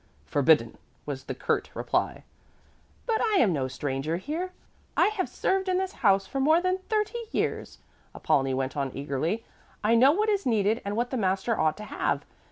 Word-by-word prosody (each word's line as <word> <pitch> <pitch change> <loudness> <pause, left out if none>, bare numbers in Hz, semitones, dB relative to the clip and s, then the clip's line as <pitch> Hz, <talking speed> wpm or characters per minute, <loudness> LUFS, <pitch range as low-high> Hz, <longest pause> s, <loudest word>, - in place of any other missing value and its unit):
"Forbidden," 140 - +3 0.3
was 135 -2 -5
the - - -4
curt - - -1
reply. - - -1 0.8
"But 450 -2 +1
I 440 -2 +2
am 220 - +4
no 135 -4 -1
stranger 140 +4 -2
here. 325 - -4 0.5
I - - +5
have 425 -3 -2
served 380 0 0
in 365 - +2
this 380 0 -1
house 195 -4 +4
for 270 +8 -4
more 310 +5 +5
than 370 +1 0
thirty 430 +2 0
years," - - -2 0.4
Apollonie 135 -1 +1
went 130 +2 -2
on 140 -2 -1
eagerly. 150 +10 -2 0.4
"I 215 +2 +3
know 255 +4 +7
what 420 +7 +1
is 405 -2 +1
needed 220 -1 +1
and 200 +1 -3
what 240 +2 -1
the 260 - -1
master 195 +2 +1
ought 155 -5 +1
to 210 - -7
have. - - -2
215 Hz, 180 wpm, -27 LUFS, -, 0.8 s, know